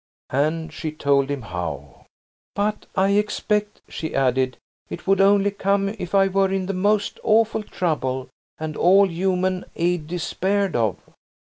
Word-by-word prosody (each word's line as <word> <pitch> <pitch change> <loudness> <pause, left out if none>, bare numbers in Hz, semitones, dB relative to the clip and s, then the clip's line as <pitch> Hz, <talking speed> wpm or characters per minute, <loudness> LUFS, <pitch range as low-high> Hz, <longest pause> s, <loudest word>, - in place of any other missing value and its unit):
And 155 +4 0
she 160 -3 -4
told 140 -2 +1
him 140 -3 -3
how. 80 - -6 0.5
"But, 210 +1 -1
I 190 +1 +3
expect," 210 0 0
she 160 - -5
added, 130 -1 +1 0.3
"it - - -7
would 195 0 +3
only 200 0 +4
come 200 0 0
if 200 -3 -5
I 195 0 +6
were 195 0 +2
in 195 -1 -1
the 195 - -2
most 205 +2 0
awful 220 0 +3
trouble 130 -10 -2 0.3
and 155 -1 -5
all 195 +3 +5
human 185 +1 0
aid 170 -2 0
despaired 190 +3 -1
of." 110 -4 +1
185 Hz, 145 wpm, -23 LUFS, 150-200 Hz, 0.5 s, I